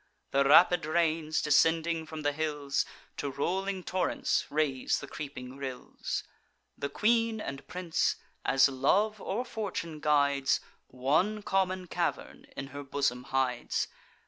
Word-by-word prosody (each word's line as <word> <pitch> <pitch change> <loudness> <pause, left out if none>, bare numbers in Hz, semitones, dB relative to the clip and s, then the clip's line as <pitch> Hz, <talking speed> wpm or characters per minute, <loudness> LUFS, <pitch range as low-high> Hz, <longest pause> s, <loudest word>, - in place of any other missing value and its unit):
The 140 0 +4
rapid 175 +3 +6
rains, 160 -1 +1
descending 160 +2 +3
from 155 -1 -6
the 145 - +2
hills, 145 -2 -1 0.3
To 145 - -2
rolling 185 +7 -2
torrents 185 +1 0
raise 145 -3 +1
the - - -7
creeping 135 -3 -7
rills. 130 -2 -4 0.5
The 140 - -3
queen 225 +6 +2
and 140 -8 -6
prince, 180 -3 0 0.3
as 135 +1 +5
love 195 +11 +1
or 235 +6 -2
fortune 185 -9 -4
guides, 140 -2 +3 0.3
One 155 +12 +1
common 185 -1 0
cavern - - -3
in 135 - -5
her 145 - -5
bosom 135 -3 -1
hides. 130 -2 0
155 Hz, 125 wpm, -30 LUFS, 140-185 Hz, 0.5 s, rapid